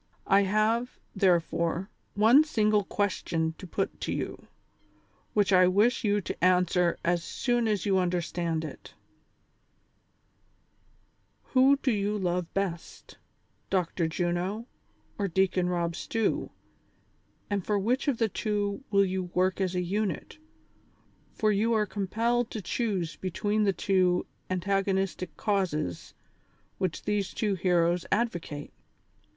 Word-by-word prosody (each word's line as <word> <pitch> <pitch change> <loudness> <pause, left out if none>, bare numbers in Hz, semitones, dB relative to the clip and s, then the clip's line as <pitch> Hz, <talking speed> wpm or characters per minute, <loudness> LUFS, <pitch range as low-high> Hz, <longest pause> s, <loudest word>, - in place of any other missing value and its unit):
I 195 +1 +5
have, 220 +5 +1 0.2
therefore, 175 -1 +1 0.2
one 225 +8 +6
single 215 -8 +2
question 170 -5 -1
to 185 - -8
put - - -3
to - - -2
you, - - -4 0.9
which 205 -2 +3
I 185 -1 +6
wish 210 +6 +3
you 205 -1 +2
to 170 - -6
answer 180 -1 +3
as 170 0 +1
soon 240 +4 0
as 210 -4 0
you 195 -2 +3
understand 170 -2 -1
it: - - -10 1.6
— - - -41
Who 265 +2 +6
do 260 - +3
you 205 0 0
love 180 -2 -1
best, 185 -4 -4 0.5
Dr. 175 -2 0
Juno 175 +6 -2 0.5
or 200 - +1
Deacon 185 -1 +1
Rob 170 -2 -1
Stew, 225 +3 -1 1.0
and 200 -2 -1
for 210 +2 0
which 245 +9 0
of 275 -5 +2
the 225 - +2
two 205 +2 -2
will 200 -1 +4
you 185 0 -2
work 185 +1 +1
as 185 -1 0
a 180 - 0
unit, 200 - -3 0.9
for 215 -1 +1
you 220 +3 +2
are 215 -1 +2
compelled 225 +5 -1
to 220 - -5
choose 190 -7 -2
be 185 - -3
tween 210 +4 0
the 200 - +4
two 185 -2 +1 0.2
antagonistic 190 -1 -1
causes 170 - -2 0.6
which 185 -4 -2
these 205 -2 -1
two 210 -3 0
heroes 175 -1 +2
advocate 175 -10 -2
195 Hz, 130 wpm, -28 LUFS, 180-210 Hz, 1.6 s, one